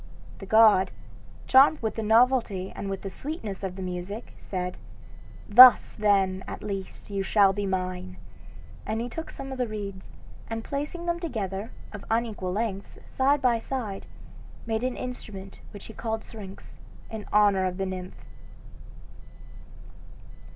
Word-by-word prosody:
The 195 - -9
god, 215 -3 +6 0.6
charmed 275 +4 +6
with 220 - 0
the 225 - -4
novelty 220 -4 +2
and 195 - -5
with 195 -1 -4
the 195 - -4
sweetness 225 - -5
of 190 -2 -4
the 190 - -6
music, 185 +5 -6
said, 180 -1 -5 0.7
'Thus, 250 +4 +9
then, 195 -3 +2
at - - -7
least, 195 0 -6
you 200 -1 -1
shall 195 0 +4
be 205 0 -2
mine.' 185 - -3 0.7
And 220 +1 -2
he 235 - -2
took 325 +6 -6
some 270 0 -8
of 260 - -6
the 250 - +1
reeds, 200 -3 -6 0.4
and 225 0 -4
placing 295 +6 -4
them 345 0 -1
together, 215 - -4 0.2
of 205 - -8
unequal 225 -5 -1
lengths, 200 -1 -3
side 275 +1 +1
by 240 -2 +3
side, 225 -6 -5 0.6
made 225 -1 -1
an 255 -1 -1
instrument 195 -6 -7
which 205 - -11
he 220 - -10
called 220 0 -3
Syrinx, 200 -4 -11 0.3
in 220 -2 -6
honor 205 -2 +4
of 180 0 -2
the 195 - -1
nymph." 185 -1 -7
210 Hz, 150 wpm, -27 LUFS, 190-235 Hz, 0.7 s, Thus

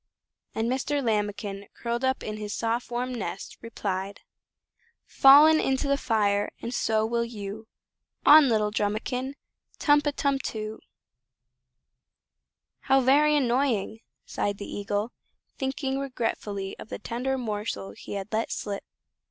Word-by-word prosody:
And 225 +1 0
Mr. 270 +3 -1
Lambikin, 205 -2 -2
curled 235 +1 -3
up 260 0 0
in 215 0 -4
his 210 0 -4
soft 230 +1 -1
warm 245 +1 -2
nest, 195 -5 -6
replied: 200 -3 -4 0.8
"Fallen 300 +4 +7
into 270 0 0
the 280 - +3
fire, 205 -6 +1
and 235 - -5
so 220 -2 +1
will 235 +1 0
you 220 -1 -7 0.6
On 300 -2 +8
little 215 -2 +2
Drumikin. 240 +6 -2 0.4
Tum 290 -1 +4
pa, 295 - 0
tum 280 -1 +1
too!" 215 -3 -5 2.0
"How 270 - +3
very 295 +4 +4
annoying!" 245 -5 +1 0.3
sighed 205 -1 -2
the 200 - -6
Eagle, 205 +3 -3 0.5
thinking 265 0 -2
regretfully 220 -7 -3
of - - -10
the - - -4
tender 260 +3 -2
morsel 210 - -4
he 100 - -9
had 200 +1 -5
let 220 +1 0
slip. 200 -1 -4
230 Hz, 130 wpm, -27 LUFS, 205-265 Hz, 2.0 s, On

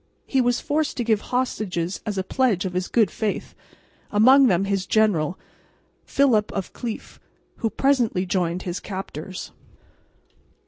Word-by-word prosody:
He 270 - +2
was 245 0 +2
forced 305 +1 -1
to 245 - 0
give 220 -3 +2
hostages 200 -8 -2
as 205 -2 -2
a 190 - 0
pledge 210 -3 +1
of 185 - -3
his 180 0 -1
good 220 -5 +2
faith, 215 -3 -3 0.6
among 260 +6 +6
them 190 -2 +2
his 195 -1 -1
general, 185 -6 +2 0.7
Philip 245 -7 +2
of 195 -2 -4
Cleef, 235 -3 -6 0.4
who 225 - -1
presently 240 -8 +1
joined 180 -1 -1
his 175 0 -3
captors. 185 -2 -7
210 Hz, 140 wpm, -23 LUFS, 185-245 Hz, 0.7 s, among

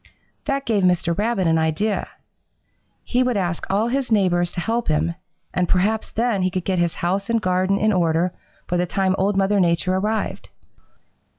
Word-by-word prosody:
"That 275 -1 -1
gave 210 -4 +1
Mr. 175 -2 +2
Rabbit 210 -1 0
an 165 -1 +3
idea. 160 +7 0 1.0
He 250 - 0
would 250 -3 +1
ask 175 -3 -2
all 210 +4 +1
his 265 -1 -1
neighbors 175 -4 +2
to - - -4
help 230 +5 -1
him, 155 +2 +1 0.4
and 180 -1 0
perhaps 210 +4 +1
then 230 -3 0
he 185 - +2
could 185 -1 -4
get 185 -2 0
his 170 -1 0
house 195 +4 -1
and 230 0 +2
garden 185 0 +1
in 215 +1 +2
order 170 0 +1 0.3
by 180 - 0
the 175 0 0
time 190 +1 +1
Old 195 +1 +1
Mother 195 +1 +2
Nature 175 +1 +2
arrived. 215 +3 -2
190 Hz, 180 wpm, -22 LUFS, 175-215 Hz, 1.0 s, an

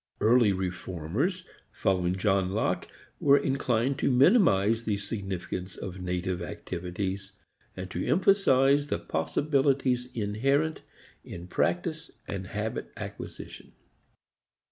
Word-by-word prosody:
Early 115 -1 +5
reformers, 95 - -2 0.3
following 90 -1 0
John 95 -1 +1
Locke, 110 - 0 0.3
were 140 -1 +6
inclined 130 -2 0
to - - +2
minimize 125 - +4
the 105 -3 0
significance 95 -3 -5
of 95 0 -6
native 90 0 -2
activities, 95 +3 -5 0.4
and 95 0 -5
to 90 - -2
emphasize 145 -7 +4
the - - -1
possibilities 130 - +1
inherent 135 +9 0 0.4
in 85 0 -8
practice 165 - -1 0.2
and 95 -2 -5
habit 105 - -4
acquisition. - - -8
105 Hz, 100 wpm, -28 LUFS, 95-135 Hz, 0.4 s, were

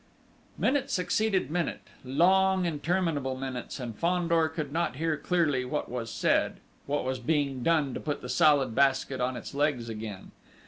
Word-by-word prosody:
Minute 275 0 +1
succeeded 185 -3 0
minute, 175 0 -2 0.2
long, 185 +7 +3
interminable 160 -4 -1
minutes, 130 0 -5
and 120 -4 -5
Fandor 170 +1 +2
could 155 -2 -4
not 165 -7 0
hear 160 +2 0
clearly 150 -4 +1
what 125 - -3
was 120 -2 -4
said, - - +1 0.3
what 145 -2 -1
was 130 0 -2
being 140 0 0
done 150 -3 +2
to - - -4
put 150 -2 -3
the - - -5
Salad 135 0 +3
Basket 135 0 +2
on 125 0 -1
its 120 - -8
legs 140 -5 0
again.... 105 -3 -7
145 Hz, 155 wpm, -28 LUFS, 130-170 Hz, 0.3 s, long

